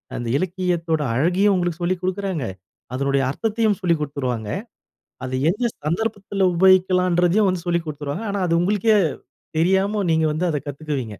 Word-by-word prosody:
அந்த 120 - -4
இலக்கியத்தோட 175 -3 -1
அழகையும் 180 - +3
உங்களுக்கு 175 -2 -2
சொல்லிக் 175 +1 -1
குடுக்குறாங்க, 185 - -2 0.5
அதனுடைய 140 +1 +1
அர்த்தத்தையும் 215 - 0
சொல்லிக் 170 -4 +1
குடுத்துருவாங்க, 130 -7 -3 0.7
அத 130 - -4 0.2
எந்த 210 +7 -1 0.2
சந்தர்ப்பத்துல 200 +2 0
உபயோகிக்கலாம்ன்றதையும் 185 +1 +4
வந்து 180 -1 -3
சொல்லிக் 170 -1 0
குடுத்துருவாங்க. 150 +6 -5
ஆனா 200 -1 -2
அது 170 - +2
உங்களுக்கே 210 +3 +3 0.6
தெரியாம 195 +4 +2
நீங்க 160 0 +2
வந்து 155 +4 -1
அத 150 -2 -1
கத்துக்குவீங்க. 140 -6 -4
175 Hz, 135 wpm, -22 LUFS, 150-190 Hz, 0.7 s, உபயோகிக்கலாம்ன்றதையும்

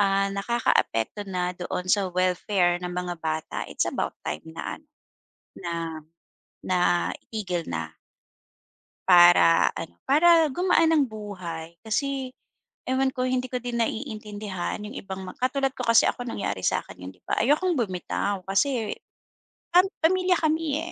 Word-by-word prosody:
ah, 195 0 +2
nakakaapekto 200 - 0
na 180 -1 -1
doon 180 0 -4
sa 200 -2 +2
welfare 180 0 +1
ng 180 0 -4
mga 175 -1 -4
bata, 160 -1 -3
it's - - 0
about - - -3
time 75 - -4
na 160 - -6
ano, 305 - -32 0.7
na 175 -3 -5 0.9
na 185 - 0 0.5
itigil 185 -6 -3
na 80 -2 -4 1.2
para 175 - +7
ano, 85 - -6 0.2
para 325 +2 +6
gumaan 330 +2 +3
ang 305 -4 +4
buhay. 180 -7 -7
Kasi 265 +3 -2 0.6
ewan 265 0 +1
ko, 255 - -3
hindi 255 0 0
ko 250 -2 -3
din 245 -1 -3
naiintindihan 210 -4 -4
yung 210 - -7
ibang 190 -1 -6
ma 185 - -8
katulad 270 +2 +1
ko 250 - -3
kasi 230 -1 +6
ako 245 - -5
nangyari 100 - -3
sa - - +2
akin - - -13
'yon, 90 +1 -7
'di 90 - -28
ba? - - -1
Ayokong 310 +7 +2
bumitaw, 195 -2 -2
kasi 230 +2 +1 0.8
pam 365 +2 +7 0.2
pamilya 365 +1 +3
kami 315 -2 0
205 Hz, 145 wpm, -26 LUFS, 180-265 Hz, 1.2 s, para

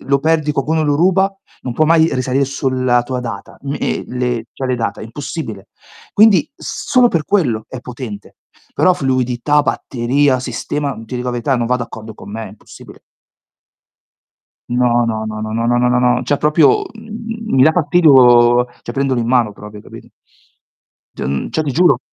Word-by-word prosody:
lo 140 +1 +1
perdi, 155 -1 +1
qualcuno 155 +3 0
lo 145 -1 +1
ruba, 190 +3 +2 0.3
non 125 - -4
può 155 +6 +2
mai 160 0 +4
risalire 130 +2 0
sulla 130 -2 0
tua 125 0 -4
data. 115 -5 -7
N 140 +1 -3
ehm, - - -2
le 125 -2 -2
cioè 130 - -5
le 125 - 0
date. 115 -4 -3
Impossibile. 115 - -7 0.4
Quindi 210 -5 +5
solo 250 -2 +1
per 165 -8 -1
quello 130 - 0
è 130 - -8
potente. 120 -5 -9 0.4
Però 185 - +4
fluidità, 130 +1 +1
batteria, 130 +1 0
sistema 140 +3 -3
ti 115 - -8
dico 125 - -4
la - - 0
verità 125 +2 0
non 120 - -1
va 125 +2 +1
d'accordo 110 -2 -7
con 100 - -12
me, 110 0 -6
impossibile. 100 +2 -15 1.7
No, 120 -1 +2
no, 110 -1 -2
no, 110 0 -5
no, 110 0 -4
no, 115 +1 -1
no, 120 +1 +2
no, 125 0 +2
no, 125 0 +2
no, 125 0 +2
cioè 145 +3 0
proprio, 150 -2 +3
mhmm, 225 0 -6
mi 130 - +5
da 155 - +6
fastidio 130 -8 +5 0.2
cioè - - -7
prenderlo 135 -2 0
in 115 - -3
mano 120 -4 +2
proprio, 105 +1 -11
hai - - -13
capito. - - -12 1.1
Dun 70 +1 -3
cioè 160 - -1
ti 145 -3 -3
giuro. 175 +5 +4
130 Hz, 175 wpm, -17 LUFS, 120-150 Hz, 1.7 s, da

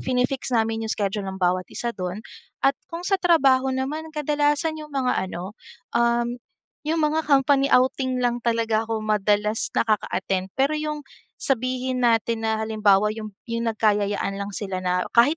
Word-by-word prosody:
fini-fix 255 +1 0
namin 225 0 0
yung - - +1
schedule 200 -1 -2
ng 190 - -5
bawat 185 0 0
isa 235 0 -3
do'n. 185 +1 -5 0.4
At 275 - +6 0.2
kung 335 +1 -6
sa 390 0 +1
trabaho 270 -7 +4
naman, 270 +5 -2
kadalasan 300 +1 0
yung 305 - -9
mga 270 -3 0
ano, 185 +2 -6 0.4
uhm, 235 +1 +1 0.4
yung 310 +2 -1
mga 310 +1 +1
company 275 0 +4
outing 260 -1 +2
lang 240 0 +1
talaga 230 -1 +1
ako 220 -1 -2
madalas 210 0 +1
nakaka-attend. 195 -3 0
Pero 275 +3 +2
yung 305 -1 -3 0.4
sabihin 255 0 -1
natin 230 -1 +2
na 220 0 +1
halimbawa 210 -2 +3
yump 215 -1 -7 0.2
yung 230 0 -2
nagkayayaan 205 -2 0
lang 200 - -3
sila 195 -2 -3
na 180 0 +1
kahit 265 +7 +6
235 Hz, 155 wpm, -24 LUFS, 210-275 Hz, 0.4 s, At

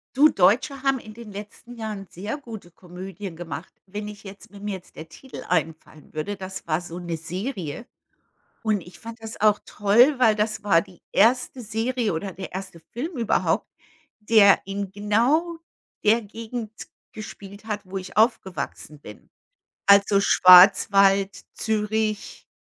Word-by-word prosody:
Du, 300 +3 +7
Deutsche 255 +9 +2
haben 270 -1 +2
in 215 -1 -12
den 230 -3 -11
letzten 210 +4 -10
Jahren 215 -4 -6
sehr 205 - -6
gute 225 -10 -10
Komödien 185 +1 -9
gemacht. 170 +1 -8
Wenn 210 +2 -6
ich 210 0 -10
jetzt 195 0 -12
mir 200 - -12
mir 205 0 -4
jetzt 185 - -14
der 160 0 -10
Titel 265 - -11
einfallen 160 -3 -3
würde, 155 +7 -3
das 190 -2 -8
war 160 +2 0
so 175 0 -8
'ne 170 -2 -4
Serie. 180 - -5 0.8
Und 215 -3 +1
ich 175 +1 -14
fand 225 0 -10
das 225 0 -7
auch 210 -1 +5
toll, 240 +7 +4
weil 225 -4 +5
das 215 0 -2
war 165 -5 +4
die 185 -3 -15
1. 250 +4 +3
Serie 225 -1 -2
oder 190 +3 -4
der 190 0 -8
1. 190 -3 -7
Film 275 +4 -5
überhaupt, 230 - +1 0.5
der 210 -2 +5
in 195 0 -4
genau 245 - +1 0.4
der 225 +2 +3
Gegend 225 +1 -7 0.4
gespielt 205 -1 -10
hat, 210 -2 -3
wo 190 +1 -5
ich 185 0 -10
aufgewachsen 190 - -1
bin. - - -13 0.6
Also 200 0 +5
Schwarzwald, 195 +1 +6
Zürich, 215 0 -2
205 Hz, 150 wpm, -24 LUFS, 190-225 Hz, 0.8 s, Du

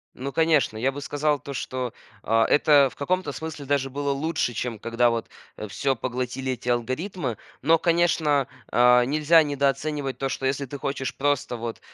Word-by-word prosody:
Ну 135 +2 -5
конечно. 155 -9 +2
Я 130 +4 +1
бы 145 - -7
сказал 145 0 0
то, 140 +2 -8
что, 130 -1 -4 0.3
а, 115 +1 +3
это 145 -2 +5
в - - -17
каком-то 180 +1 -1
смысле 150 0 -7
даже 135 -1 0
было 140 +1 -2
лучше, 140 -3 -1
чем 115 -1 -3
когда 115 +1 +2
вот, 115 -1 -3 0.3
э, 110 - -6
всё 135 +5 0
поглотили 125 +2 -3
эти 125 - -10
алгоритмы. 130 - -2 0.2
Но, 165 +4 +4
конечно, 165 -5 +2 0.2
а, 125 +1 +5
нельзя 155 +4 +4
недооценивать 140 -1 -1
то, 135 - -1
что 135 0 -4
если 140 +1 0
ты 140 +2 -7
хочешь 135 -2 -3
просто 140 -3 0
вот, 115 -1 -5
135 Hz, 175 wpm, -25 LUFS, 125-145 Hz, 0.3 s, это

